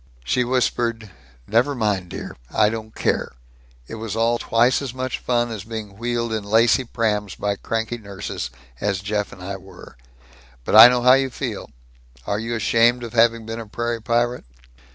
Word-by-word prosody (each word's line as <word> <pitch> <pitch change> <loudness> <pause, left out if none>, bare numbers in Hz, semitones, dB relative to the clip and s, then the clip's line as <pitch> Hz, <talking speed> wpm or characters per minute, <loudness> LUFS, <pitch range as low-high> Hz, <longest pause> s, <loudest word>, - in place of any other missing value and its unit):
She 125 - +1
whispered, 120 -3 -1 0.3
"Never 125 +7 +2
mind, 105 -6 -1
dear. - - -7
I 105 - +3
don't 110 0 -6
care. - - -1 0.5
It - - -11
was 110 -2 -4
all 115 +1 +1
twice 120 +4 +2
as 130 -3 -5
much 130 0 -3
fun 120 -1 0
as 105 -4 -5
being 110 -2 -7
wheeled 115 +1 -2
in 110 -2 -2
lacy 115 +5 +3
prams 105 -4 -1
by 100 0 -1
cranky 115 +3 -3
nurses, 100 - -6 0.3
as 100 -2 -1
Jeff 105 0 -2
and 90 - -11
I 95 +1 -5
were. 95 -9 -14 0.7
But - - 0
I 110 +2 +12
know 125 0 +1
how 125 +1 +7
you 135 0 +3
feel. 120 -5 -5 0.6
Are 100 - -1
you 115 +1 -3
ashamed 115 +2 +3
of 115 - -7
having 115 -1 +3
been 115 +1 -5
a 115 - -8
prairie 120 +1 -3
pirate?" 120 - 0
115 Hz, 175 wpm, -22 LUFS, 105-120 Hz, 0.7 s, I